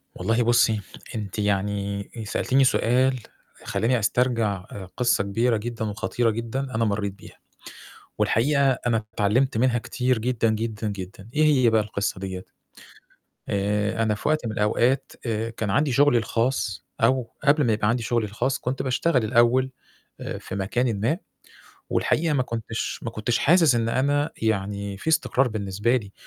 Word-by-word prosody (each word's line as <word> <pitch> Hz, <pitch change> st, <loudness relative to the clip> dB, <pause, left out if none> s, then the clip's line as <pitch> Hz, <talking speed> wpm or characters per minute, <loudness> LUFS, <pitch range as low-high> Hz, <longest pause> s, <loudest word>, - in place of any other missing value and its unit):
والله 115 Hz, +6 st, +1 dB
بُصّي، 115 Hz, -3 st, +3 dB, 0.3 s
أنتِ 105 Hz, -1 st, -5 dB
يعني 100 Hz, 0 st, -1 dB
آآ 110 Hz, -, -4 dB
سألتيني 130 Hz, +6 st, +1 dB
سؤال 130 Hz, +1 st, +2 dB, 0.4 s
خلّاني 110 Hz, +5 st, 0 dB
أسترجَع 110 Hz, -4 st, 0 dB
آآ 95 Hz, -, -7 dB
قِصّة 120 Hz, -4 st, +2 dB
كبيرة 115 Hz, +4 st, +1 dB
جدًا 115 Hz, +1 st, -4 dB
وخطيرة 115 Hz, +3 st, -1 dB
جدًا 115 Hz, +3 st, -3 dB, 0.2 s
أنا 115 Hz, 0 st, +2 dB
مرّيت 100 Hz, -2 st, -1 dB
بيها، 100 Hz, -, -15 dB, 0.8 s
والحقيقة 140 Hz, +4 st, +3 dB
أنا 120 Hz, -3 st, -1 dB
اتعلِّمت 115 Hz, +5 st, +1 dB
منها 120 Hz, 0 st, +2 dB
كتير 125 Hz, +1 st, -1 dB
جدًا، 115 Hz, 0 st, 0 dB
جدًا، 110 Hz, 0 st, -2 dB
جدًا، 100 Hz, 0 st, -7 dB
إيه 155 Hz, +1 st, +3 dB
هي 135 Hz, -6 st, +4 dB
بقى 110 Hz, -1 st, +3 dB
القصة 100 Hz, -2 st, -3 dB
ديّة؟ 95 Hz, -1 st, -5 dB, 1.1 s
آآ 105 Hz, +2 st, 0 dB
أنا 110 Hz, -1 st, +1 dB
في 105 Hz, -, -5 dB
وقت 155 Hz, -4 st, +1 dB
من 110 Hz, -, -2 dB
الأوقات 120 Hz, +6 st, +1 dB
آآ 115 Hz, -1 st, -1 dB
كان 110 Hz, -2 st, -4 dB
عندي 140 Hz, +8 st, +2 dB
شُغلي 140 Hz, 0 st, +4 dB
الخاص 115 Hz, -2 st, -1 dB, 0.2 s
أو 125 Hz, +1 st, +2 dB
قبل 150 Hz, +1 st, +4 dB
ما 115 Hz, -, +3 dB
يبقى 105 Hz, 0 st, +1 dB
عندي 120 Hz, 0 st, 0 dB
شُغلي 115 Hz, -1 st, 0 dB
الخاص، 120 Hz, +6 st, -1 dB
كنت 130 Hz, +2 st, -2 dB
باشتغل 130 Hz, 0 st, +1 dB
الأول 120 Hz, +4 st, +3 dB, 0.5 s
آآ -, -, -4 dB
في -, -, -7 dB
مكان 110 Hz, +3 st, -1 dB
ما، 120 Hz, +11 st, +1 dB, 0.7 s
والحقيقة 165 Hz, 0 st, +1 dB
ما 130 Hz, -, +2 dB
كنتش 115 Hz, -2 st, -4 dB
ما 115 Hz, -, -4 dB
كنتش 115 Hz, +1 st, -1 dB
حاسس 165 Hz, -4 st, +5 dB
إن 115 Hz, -1 st, 0 dB
أنا 145 Hz, +4 st, +1 dB
يعني 100 Hz, -2 st, -1 dB
في 100 Hz, -, -6 dB
استقرار 135 Hz, -4 st, +2 dB
بالنسبة 105 Hz, +2 st, 0 dB
لي 100 Hz, -5 st, -5 dB
115 Hz, 160 wpm, -24 LUFS, 105-125 Hz, 1.1 s, حاسس